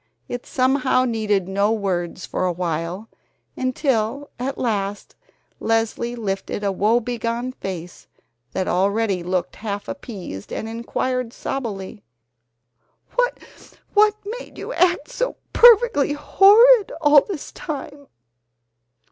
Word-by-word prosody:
It 245 0 -6
somehow 255 0 +2
needed 210 -5 0
no 200 +2 +1
words 185 -5 -2
for 185 - -1
awhile, 175 +3 -3 0.5
until 255 0 -1
at 270 +2 -3
last 205 -4 -2 0.4
Leslie 225 +1 0
lifted 205 -2 -3
a 200 - +1
woebegone 235 +4 0
face 180 -7 -7 0.4
that 190 - -2
already 200 +1 +1
looked 180 +1 -2
half 205 -2 -5
appeased 195 - -7
and 220 - -4
inquired 235 +2 -2
sobbily: 210 -6 -5 1.1
"What 425 -3 0 0.2
made - - -12
you - - -6
act 345 -3 +2
so - - -2 0.2
perfectly 465 - +6
horrid 415 +8 +6
all 295 -2 +6
this 360 -5 -7
time?" 285 -2 -7
230 Hz, 105 wpm, -22 LUFS, 195-280 Hz, 1.1 s, perfectly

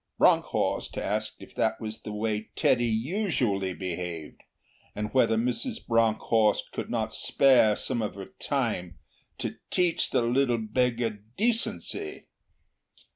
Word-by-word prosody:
Bronckhorst - - +2
asked 110 +1 -2
if - - -13
that 110 - 0
was 110 -1 -5
the 105 - -6
way 105 0 -2
Teddy 120 0 +3
usually 115 - 0
behaved, 90 -3 -5 0.5
and 105 0 -4
whether 115 -4 +4
Mrs. 125 - -1
Bronckhorst 110 -1 +2
could - - -5
not - - -1
spare 125 -6 +4
some 120 +1 -1
of 105 - -3
her 100 -1 -9
time 110 - -2 0.4
'to - - -4
teach 180 -2 +2
the - - +2
little 120 0 +2
beggar 115 -1 0 0.2
decency'. 240 - 0
115 Hz, 125 wpm, -28 LUFS, 105-130 Hz, 0.5 s, whether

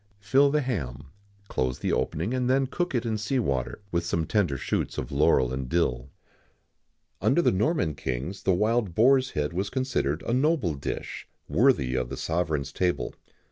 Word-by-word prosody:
Fill 135 +8 +4
the 150 +1 +2
ham, 75 - -4 0.4
close 65 -6 -1
the - - -2
opening, 90 +10 -1
and 125 -1 0
then 135 +1 +3
cook 175 +3 -2
it 120 0 0
in 110 -2 -1
sea 135 +6 -1
water, 70 - -2
with 85 -1 0
some 85 -1 -1
tender 90 -8 +1
shoots - - -2
of - - -4
laurel 65 -1 +3
and 65 -1 -4
dill.[XIX 65 -7 0 1.2
85] - - -1
Under 155 +6 +4
the - - +4
Norman 95 - +1
kings 70 +8 -4
the 95 - +2
wild 105 0 +1
boar's 130 +3 +4
head 75 +2 0
was 95 +3 -1
considered 130 - -1
a 115 - -1
noble 135 - +2
dish, 70 -1 -5 0.2
worthy 110 - +3
of 65 -2 -1
the - - -5
sovereign's 80 -4 -1
table. 90 +3 -1
95 Hz, 180 wpm, -27 LUFS, -, 1.2 s, Fill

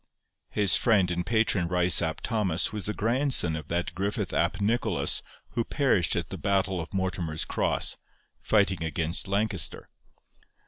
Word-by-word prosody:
His 105 -2 +5
friend 100 -7 +2
and 90 0 -2
patron 110 -5 +1
Ryce 90 0 +3
ap 80 -2 -2
Thomas 105 -6 0
was 105 -4 -5
the 105 - -2
grandson 115 - +2
of 80 -2 -7
that 85 +1 -2
Griffith 100 +3 -3
ap - - 0
Nicholas 110 -2 +1 0.3
who 120 - -2
perished 115 - +1
at - - -3
the - - -7
battle 95 -2 0
of 80 - -9
Mortimer's 90 -5 -2
Cross, - - 0 0.4
fighting 100 -5 +1
against 80 +2 0
Lancaster. 100 -3 -1
95 Hz, 145 wpm, -27 LUFS, 85-110 Hz, 0.4 s, His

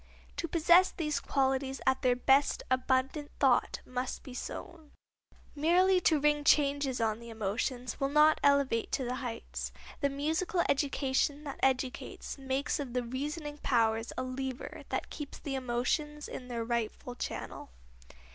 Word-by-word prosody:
To 335 - -2
possess 345 +3 +5
these 300 -4 -2
qualities 270 0 0
at 265 0 +2
their 250 -2 +3
best 270 +3 +3
abundant 260 +3 +1
thought 265 -3 +3
must 255 +1 -4
be 260 - -9
sown. 320 +4 -7 0.6
Merely 360 +5 +4
to 315 -3 +3
ring 295 0 +2
changes 285 -3 +3
on 220 -1 0
the 235 0 -10
emotions 225 +4 -3
will 275 - +1
not 300 +2 +5
elevate 280 -5 +3
to 265 - +1
the 250 +1 -2
heights. 235 -3 -5 0.3
The 280 - +2
musical 320 +6 0
education 280 +1 +1
that 285 -2 -7
educates 265 +1 -1
makes 270 +2 -1
of 265 -4 -5
the 250 -1 0
reasoning 295 +4 -4
powers 225 -3 +1
a 255 - -1
lever 255 0 -5
that - - -3
keeps 295 -2 -7
the 280 - -5
emotions 265 +4 -1
in 250 - -7
their 235 -2 -3
rightful 235 +1 -2
channel. 245 - -6
270 Hz, 145 wpm, -31 LUFS, 250-295 Hz, 0.6 s, possess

